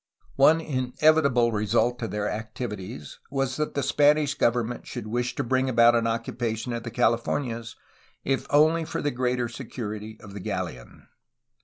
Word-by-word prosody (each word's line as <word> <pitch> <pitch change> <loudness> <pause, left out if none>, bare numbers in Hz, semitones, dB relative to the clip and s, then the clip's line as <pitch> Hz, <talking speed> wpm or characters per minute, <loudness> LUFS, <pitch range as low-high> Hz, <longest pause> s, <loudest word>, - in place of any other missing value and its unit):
One 155 +4 +6
inevitable 135 -2 +2
result 115 +3 +1
of 115 - -2
their 105 0 -2
activities 110 0 -6
was 135 -1 -1
that 150 0 -2
the 140 - 0
Spanish 145 +1 +3
government 120 0 0
should - - -6
wish 120 +3 -2
to - - -1
bring 130 +2 +1
about 120 -1 +6
an 115 -1 +2
occupation 115 +1 -2
of 115 - -3
the 120 - -6
Calif 115 +1 +1
ornias, 115 -5 -3 0.5
if 135 0 -1
only 155 +3 +4
for 160 - -4
the 145 - +1
greater 125 0 0
security 110 -3 -7
of 100 -2 -12
the 100 - -6
galleon. 60 -8 -5
120 Hz, 160 wpm, -26 LUFS, 115-135 Hz, 0.5 s, One